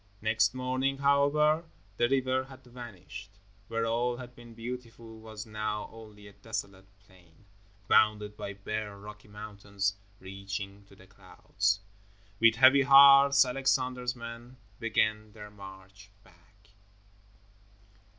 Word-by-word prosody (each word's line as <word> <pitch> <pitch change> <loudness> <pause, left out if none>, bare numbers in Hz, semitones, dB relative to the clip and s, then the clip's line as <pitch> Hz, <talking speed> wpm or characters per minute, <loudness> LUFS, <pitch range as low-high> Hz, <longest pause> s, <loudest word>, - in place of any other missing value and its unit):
Next 110 +2 +1
morning, 130 +2 -1
however, 145 +3 +3 0.3
the 120 0 +2
river 130 -1 0
had 130 0 -15
vanished. 110 -5 -11 0.3
Where 115 0 -2
all 120 +2 -1
had 125 -1 -10
been 120 -1 -14
beautiful 115 -1 -8
was 110 -1 -9
now 110 -1 -4
only 105 -2 -13
a 100 - -14
desolate 100 -4 -7 0.2
plain, 90 0 -23 0.4
bounded 105 -1 +3
by 100 - -6
bare 105 +1 -5
rocky 105 +1 -12
mountains, 100 -1 -4 0.3
reaching 100 +1 -7
to 100 - -19
the 95 - -17
clouds. 100 +1 -3 0.6
With 115 0 +5
heavy 130 +3 +6
hearts 140 0 +7
Alexander's 125 -1 -1
men 120 +1 -10 0.2
began 110 -2 0
their 105 -2 -11
march 95 0 -13
back. 100 +4 -25
110 Hz, 120 wpm, -29 LUFS, 100-125 Hz, 0.6 s, hearts